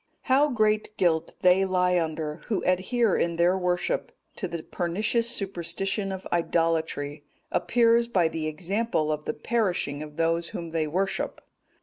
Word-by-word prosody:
"How 280 +3 +3
great 215 -3 +1
guilt 165 -2 +1
they 185 +1 +5
lie 180 -1 +2
under, 155 -1 -3
who 215 -5 -1
adhere 195 +4 +2
in 170 0 0
their 175 +2 +3
worship 180 -1 -1 0.3
to 190 - -3
the 170 -2 -5
pernicious 215 +7 0
superstition 195 -1 -1
of 190 0 -6
idolatry, 165 -4 0 0.3
appears 235 0 +3
by 185 -8 +2
the 160 -1 -3
examples 170 +1 -1
of 150 0 -3
the - - -2
perishing 180 -7 -1
of 150 -1 -9
those 165 0 +1
whom 170 -1 -6
they 160 -1 0
worship. 190 +5 -2
180 Hz, 145 wpm, -26 LUFS, 165-210 Hz, 0.3 s, they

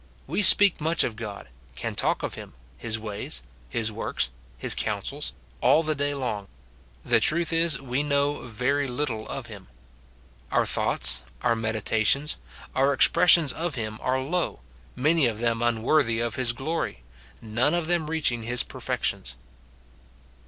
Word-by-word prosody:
We - - 0
speak 200 -2 +6
much 160 +2 +2
of 115 - -2
God, 105 - -7 0.3
can - - -3
talk - - 0
of - - -2
him, - - -10 0.2
his 110 - -2
ways, 105 - -4 0.3
his 110 - -1
works, 105 - -2 0.3
his - - +2
counsels, - - -3 0.3
all 140 +6 +5
the 155 0 0
day 145 0 -1
long; 110 -7 -3 0.6
the 120 -2 +4
truth 165 +8 +1
is, 165 -3 +2
we 130 +1 -1
know 140 -2 0
very 135 +5 +1
little 125 -4 -3
of - - -5
him. - - -10 0.8
Our - - +3
thoughts, - - +1 0.2
our 120 -1 +3
meditations, 110 +5 +1 0.4
our 135 +2 +3
expressions 170 0 +5
of 165 -2 -2
him 110 -2 -4
are 130 +1 +1
low, 165 +7 -2 0.3
many 150 +2 +3
of 110 -2 -2
them 115 0 0
unworthy 120 +1 +2
of 120 -1 -1
his 125 -2 +1
glory, 135 - -3 0.4
none 120 +8 +1
of 175 -2 0
them 165 -2 0
reaching 150 -7 0
his 120 +2 +1
perfections. 60 +1 -2
130 Hz, 150 wpm, -26 LUFS, 115-155 Hz, 0.8 s, speak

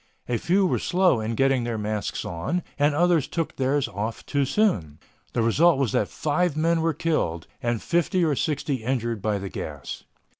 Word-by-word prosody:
A 120 - 0
few 190 +3 +2
were - - +1
slow 180 -8 +3
in 110 +1 -2
getting 135 -1 +2
their 115 -1 -2
masks 105 0 -3
on 85 - -2 0.2
and 145 0 +3
others 170 -2 +3
took 165 -2 -3
theirs 135 +1 +1
off 110 +1 -4
too 140 -1 +1
soon. 100 - +1 0.4
The 115 - +1
result 160 +8 +4
was 135 -6 +1
that 105 - +1
five 155 +1 0
men 165 +1 +2
were 165 -2 +1
killed 85 - -1 0.2
and 120 -3 -1
fifty 175 +1 +1
or 150 -3 +1
sixty 140 -4 -1
injured 120 -3 -1
by 105 0 0
the 100 0 -5
gas. - - -6
135 Hz, 185 wpm, -25 LUFS, 110-165 Hz, 0.4 s, result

